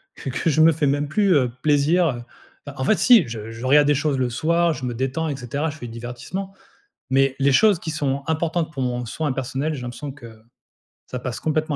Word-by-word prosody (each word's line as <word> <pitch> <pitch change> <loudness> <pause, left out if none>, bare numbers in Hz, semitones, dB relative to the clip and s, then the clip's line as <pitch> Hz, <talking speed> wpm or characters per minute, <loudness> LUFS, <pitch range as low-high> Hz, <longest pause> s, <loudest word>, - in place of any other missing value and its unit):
que - - -6
que 130 +6 -1
je 155 - +1
me 160 +1 +6
fais 150 -1 0
même 145 +1 0
plus, 200 +4 +2
heu, 130 -4 +3
plaisir. 155 +4 +3 0.6
Heu, 145 - -5
en 130 - -4
fait 210 +10 +3
si, 245 - +6
je 110 -1 -6
je 115 +2 -7
regarde 145 +2 +5
des 145 - +4
choses 145 0 0
le 130 -1 0
soir, 170 +6 +1
je 140 - -8
me 120 - -3
détends 135 +6 -2
et 145 - -2
cetera, 140 +5 -3
je 155 - -8
fais 120 - -7
du 115 - -9
divertissement. 125 +12 -6 0.6
Mais, 135 0 +2
les 140 0 +3
choses 210 +5 +5
qui 160 - -4
sont 140 -3 -2
importantes 160 0 -1
pour 135 -4 -4
mon 125 -1 -2
soin 150 +5 -2
personnel, 135 +4 -3
j'ai 135 - -6
l'impression 125 +4 -6
que, 115 -5 -14 0.7
ça 125 - -4
passe 125 -1 -5
complètement 155 +2 -1
140 Hz, 230 wpm, -22 LUFS, 125-160 Hz, 0.7 s, me